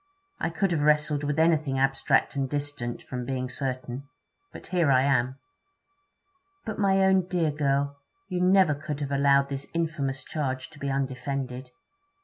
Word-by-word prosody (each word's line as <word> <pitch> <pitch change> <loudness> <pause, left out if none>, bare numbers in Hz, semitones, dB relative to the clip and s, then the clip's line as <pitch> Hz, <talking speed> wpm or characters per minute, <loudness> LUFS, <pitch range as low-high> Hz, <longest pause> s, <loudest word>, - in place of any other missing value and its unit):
I - - 0
could 190 +3 0
have 160 -3 +1
wrestled 150 -1 +2
with 145 +1 -1
anything 155 -4 +2
abstract 135 +1 +2
and 135 -1 -1
distant, 145 -4 -4
from 125 -1 -5
being 130 0 -3
certain. 130 0 -4 0.4
But - - -10
here 175 -5 +1
I 130 0 +5
am.' 130 -2 +2 1.3
'But, 215 -1 -4
my 195 -1 +4
own 190 -1 +3
dear 170 -4 +1
girl, 140 -1 0 0.3
you 180 -1 -2
never 185 -3 +5
could 150 0 -5
have 140 -1 -3
allowed 140 0 +3
this 140 0 -5
infamous 150 -5 -1
charge 130 -4 -3
to 145 - -15
be 140 - -2
undefended?' 130 -1 -3
140 Hz, 155 wpm, -27 LUFS, 135-160 Hz, 1.3 s, I